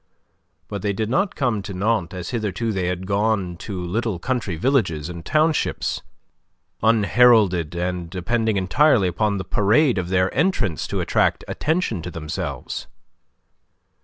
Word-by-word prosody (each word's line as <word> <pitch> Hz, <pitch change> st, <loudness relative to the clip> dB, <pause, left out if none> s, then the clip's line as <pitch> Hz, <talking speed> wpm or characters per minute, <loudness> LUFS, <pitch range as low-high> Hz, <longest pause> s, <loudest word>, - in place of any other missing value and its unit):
But 100 Hz, -2 st, -5 dB
they 100 Hz, 0 st, 0 dB
did 110 Hz, +3 st, -2 dB
not 195 Hz, +7 st, +1 dB
come 120 Hz, -7 st, 0 dB
to 100 Hz, -1 st, -7 dB
Nantes 95 Hz, -2 st, 0 dB
as 90 Hz, -2 st, -5 dB
hitherto 115 Hz, 0 st, -2 dB
they 95 Hz, -3 st, -1 dB
had 90 Hz, +1 st, -3 dB
gone 100 Hz, -2 st, 0 dB
to 95 Hz, +1 st, -6 dB
little 110 Hz, +2 st, -1 dB
country 115 Hz, -2 st, -2 dB
villages 90 Hz, -, 0 dB
and 85 Hz, -1 st, -7 dB
townships, 155 Hz, -, 0 dB, 0.8 s
unheralded 110 Hz, -6 st, +4 dB
and 90 Hz, -1 st, -3 dB
depending 110 Hz, +4 st, 0 dB
entirely 100 Hz, +3 st, +3 dB
upon 100 Hz, +4 st, 0 dB
the 95 Hz, -, -4 dB
parade 110 Hz, +5 st, +3 dB
of 90 Hz, -1 st, -4 dB
their 95 Hz, 0 st, +1 dB
entrance 130 Hz, -, 0 dB
to -, -, -2 dB
attract -, -, +1 dB
attention 160 Hz, -, -1 dB
to 85 Hz, -, -6 dB
themselves. 80 Hz, -2 st, -5 dB
100 Hz, 140 wpm, -22 LUFS, 90-115 Hz, 0.8 s, unheralded